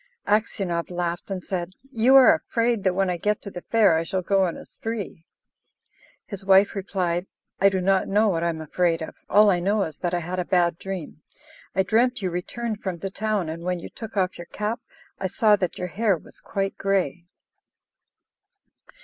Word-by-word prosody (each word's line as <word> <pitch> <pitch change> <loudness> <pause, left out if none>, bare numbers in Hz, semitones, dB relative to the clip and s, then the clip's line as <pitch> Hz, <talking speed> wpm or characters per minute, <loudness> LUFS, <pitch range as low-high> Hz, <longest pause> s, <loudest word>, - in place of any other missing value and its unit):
Aksionov 195 -5 0
laughed, 175 0 -3
and 190 -2 -4
said, 180 -1 -3 0.2
"You 245 +2 +4
are 265 -2 +9
afraid 230 -3 0
that 185 -2 +2
when 195 0 +2
I 180 -1 -1
get 210 +4 0
to 200 - -7
the 175 - -7
fair 215 -5 +4
I - - -1
shall 185 +2 -2
go 195 +2 +2
on 170 - -3
a - - -10
spree." 210 -7 -6 1.0
His 200 -2 -8
wife 195 +1 +5
replied: 185 -2 -2 0.3
"I 195 - +6
do 190 -1 -1
not 190 +1 +2
know 210 +3 +3
what 165 -3 0
I 170 - +2
am 160 -1 -4
afraid 165 +1 0
of; - - -7 0.2
all 210 0 +6
I 180 - +1
know 200 +3 +1
is 155 -4 -6
that 175 0 -1
I - - 0
had 180 +3 -4
a - - +1
bad 175 -2 +1
dream. 185 -5 -6 0.5
I 190 - +3
dreamt 245 +5 +2
you 185 - 0
returned 215 +5 -4
from 185 -3 -3
the 195 +3 -5
town, 210 -3 -1
and 160 +1 -5
when 180 0 -2
you - - -8
took 225 -2 -9
off 185 -2 0
your 175 - -8
cap 210 +5 -3 0.4
I 190 - -1
saw 210 +3 +4
that 180 -3 -2
your 180 0 -4
hair 205 0 +1
was - - -10
quite 195 0 -3
grey." 180 -4 0
190 Hz, 200 wpm, -24 LUFS, 175-210 Hz, 1.0 s, are